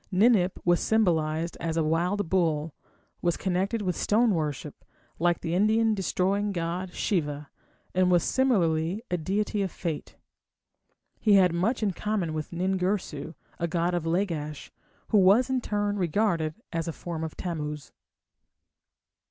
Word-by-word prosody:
Ninip 195 -2 +4
was 175 0 +4
symbolized 165 -6 +1
as 165 -1 -2
a 165 - +2
wild 175 +5 0
bull, 160 -4 0 0.5
was 175 -1 +1
connected 195 +4 -1
with 180 -3 -1
stone 225 +1 +2
worship, 150 -3 -3 0.4
like 175 0 +2
the 165 - -2
Indian 220 +4 +3
destroying 200 +1 0
god 175 +1 -3
Shiva, 150 -7 -2 0.4
and 185 0 +3
was 175 -2 +4
similarly 185 -7 +1
a 180 - +1
deity 200 +5 -1
of 195 - 0
Fate. 165 -3 -5 1.0
He 215 - +3
had 185 -3 +5
much 215 +8 0
in 205 - +2
common 190 -3 -2
with 155 -1 -4
Nin 185 +2 -1
Girsu, 180 -5 -2 0.2
a 170 - 0
god 170 +1 0
of 170 -2 -1
Lagash, 165 -4 -2 0.4
who 210 - +5
was 205 +8 +5
in 260 -1 +1
turn 205 -2 -1
regarded 170 -3 0 0.2
as 165 0 -2
a 165 - -3
form 165 -1 -5
of 160 - -6
Tammuz. 150 -4 -4
180 Hz, 145 wpm, -27 LUFS, 165-205 Hz, 1.0 s, had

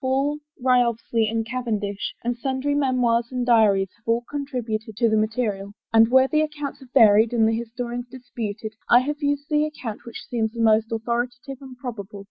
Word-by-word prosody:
Hall 270 +2 +1 0.3
and 255 - -12
Wriothesley 235 -3 +2
and 225 0 -1
Cavendish, 215 -5 -3
and 240 +1 -1
sundry 265 +3 -2
memoirs 250 -4 +1
and 250 -1 -2
diaries 205 -5 +4
have 230 - -37
all 230 +1 +1
con 285 -1 -3
tributed 220 -5 -4
to 235 0 +3
the 220 - +2
material, 215 -2 -1 0.2
and 225 0 +6
where 260 +1 +5
the 305 +2 +2
accounts 300 -2 -4
have 260 -2 -16
varied 220 -2 +5
and 225 -2 +3
the 225 - +2
historians 240 +1 -5
disputed, 225 -4 -6 0.2
I 245 - +7
have 295 +3 -4
used 285 0 -1
the 300 -1 +2
ac 305 0 -5
count 225 -4 -6
which 235 - -9
seemed 225 -2 -1
the - - -6
most 225 0 +3
authoritative 245 +4 -3
and 260 -2 -11
probable. 215 -6 -7
240 Hz, 195 wpm, -23 LUFS, 220-260 Hz, 0.3 s, I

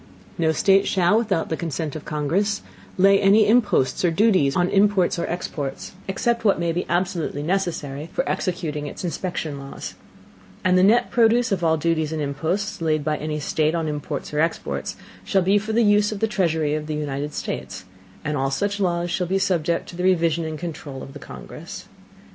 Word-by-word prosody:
No 160 -1 +3
State 195 +4 +3
shall, 185 +1 +3
without 205 -7 +1
the 160 - 0
Consent 160 -3 -4
of 155 - -6
the - - -8
Congress, 165 +8 0 0.3
lay 195 +1 +5
any 205 +2 +6
Imposts 205 - +2
or 175 - +4
Duties 165 -6 +3
on 175 0 +3
Imports 195 -3 +3
or - - -1
Exports, 145 -5 -4 0.2
except 230 +5 0
what 200 -5 +3
may 170 -1 0
be 175 +2 -2
absolutely 175 -4 -1
necessary 160 -4 -2
for - - -1
executing 160 -5 -2
it's - - -7
inspection 165 -4 -3
Laws: 135 0 -7 0.7
and 185 0 +3
the 185 - +5
net 230 +6 +4
Produce 235 0 +3
of 185 -3 0
all 160 -1 +3
Duties 160 -1 0
and 160 - -2
Imposts, 170 +9 -2
laid 155 -2 +1
by 155 +1 0
any 150 0 -3
State 155 +2 0
on 165 -2 -1
Imports 150 0 -4
or 150 - 0
Exports, 110 - -1 0.3
shall 190 - +2
be 195 +3 +4
for 215 +2 -5
the 230 +2 +3
Use 210 0 +4
of 210 - -4
the 225 - +2
Treasury 160 -7 0
of 155 0 -3
the 155 - -2
United 145 0 -3
States; 95 - -5 0.4
and 150 0 -1
all 135 -1 0
such 200 +9 -1
Laws 175 -2 0
shall 180 0 -1
be 190 +2 +1
subject 170 -3 0
to - - -9
the 180 - -3
Revision 170 -3 +2
and 155 -1 -4
Controul 150 -5 -6
of 135 - -10
the 145 - -9
Congress. - - -9
170 Hz, 195 wpm, -23 LUFS, 150-195 Hz, 0.7 s, any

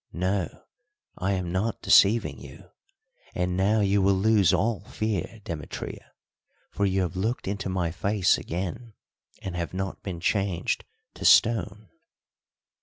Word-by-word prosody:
"No, 90 0 -2 0.6
I 95 +2 0
am 90 -2 -2
not 100 +5 -2
deceiving 110 +4 +4
you. - - -13 0.6
And 90 0 -1
now 100 +4 +2
you 100 0 +2
will 95 +1 +4
lose 100 -3 +4
all 110 -1 +1
fear, 110 0 -3
Demetria, 80 -5 -7 0.6
for 100 - 0
you 95 0 +1
have 90 -1 -4
looked 110 +6 -2
into 100 -1 -3
my 90 -3 -1
face 100 +2 +2
again 95 +6 -5 0.5
and 95 -2 -5
have 85 +1 -4
not 95 0 -4
been 90 -4 -5
changed 95 -1 -1 0.3
to - - -9
stone." 105 -2 +4
95 Hz, 135 wpm, -26 LUFS, 90-105 Hz, 0.6 s, deceiving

